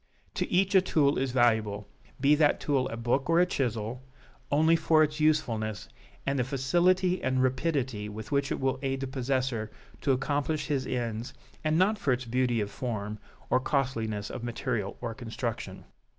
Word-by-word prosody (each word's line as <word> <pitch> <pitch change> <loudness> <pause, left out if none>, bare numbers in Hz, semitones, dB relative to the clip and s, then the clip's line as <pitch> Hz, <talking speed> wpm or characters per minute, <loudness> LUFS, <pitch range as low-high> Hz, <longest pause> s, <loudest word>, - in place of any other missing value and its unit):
To - - -2
each 190 +2 +3
a 190 - +7
tool 145 -7 +2
is 135 0 0
valuable, 110 -5 +1 0.3
be 140 +2 +5
that 150 -1 +3
tool 135 -3 0
a 115 - -5
book 120 +5 0
or 165 +1 +5
a 180 - +6
chisel, 120 -6 -2 0.5
only 160 +3 +4
for 160 -1 +4
its 155 +1 -2
usefulness, 115 -10 0 0.4
and 140 0 0
the - - +3
facility 175 +8 +2
and 130 0 +1
rapidity 130 -5 -1
with 110 +4 -8
which 140 -1 +1
it - - -1
will 130 -1 0
aid 135 -1 -2
the - - -1
possessor 130 -4 -1 0.3
to 140 - +2
accomplish 145 +3 0
his 135 -3 -1
ends, 115 -2 -3 0.3
and 155 0 +2
not 205 +4 +3
for 140 -9 +2
its 125 +1 -3
beauty 120 -1 +1
of 105 0 -3
form, 105 -4 -4 0.3
or 130 - +5
costliness 115 -7 -1
of 125 - -6
material 115 -3 -3
or 115 -2 -3
construction. 115 -1 -5
130 Hz, 175 wpm, -29 LUFS, 115-150 Hz, 0.5 s, a